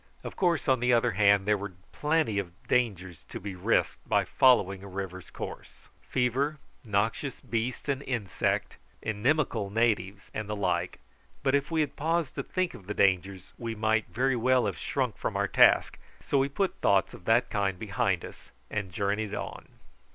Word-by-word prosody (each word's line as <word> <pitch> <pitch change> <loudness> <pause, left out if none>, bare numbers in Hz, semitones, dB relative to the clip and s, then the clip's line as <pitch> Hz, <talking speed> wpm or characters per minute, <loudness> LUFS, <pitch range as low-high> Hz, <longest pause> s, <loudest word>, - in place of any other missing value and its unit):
Of - - -7
course, 175 -5 +1
on 130 -2 +4
the 125 +1 +2
other 115 - +3
hand, 100 0 +4
there 105 -1 +2
were 100 -1 -6 0.2
plenty 150 -9 +1
of 90 -1 -8
dangers 95 -9 0
to - - -6
be 100 0 -6
risked 90 - 0
by - - +3
following 100 -7 +4
a - - -8
river's 95 -3 -6
course: - - -9
fever, 130 +5 0 0.3
noxious 110 +5 -1
beast 120 +4 -3
and 140 -1 0
insect, 115 - -1 0.3
inimical 110 -1 0
natives, 105 -3 0
and 110 -1 -4
the 105 - -1
like; 90 -4 -1 0.4
but 135 - +2
if 140 0 +1
we 165 -1 +1
had 150 - -2
paused 160 0 0
to - - -3
think 185 -2 -2
of 100 -7 -12
the 105 - -3
dangers, 95 -1 +1
we 115 -1 -4
might 110 0 +1
very 130 +2 +1
well 125 +1 +3
have 100 -4 -3
shrunk - - -1
from - - -2
our - - +1
task, - - +4 0.2
so 140 - +1
we 135 +1 +1
put 190 +7 -1
thoughts 100 +3 +3
of 110 -7 -12
that 115 +2 +3
kind 100 -3 0
behind 95 -3 -1
us - - -12 0.2
and 100 -3 -3
journeyed 100 +3 -1
on. - - -6
110 Hz, 180 wpm, -29 LUFS, 100-130 Hz, 0.4 s, on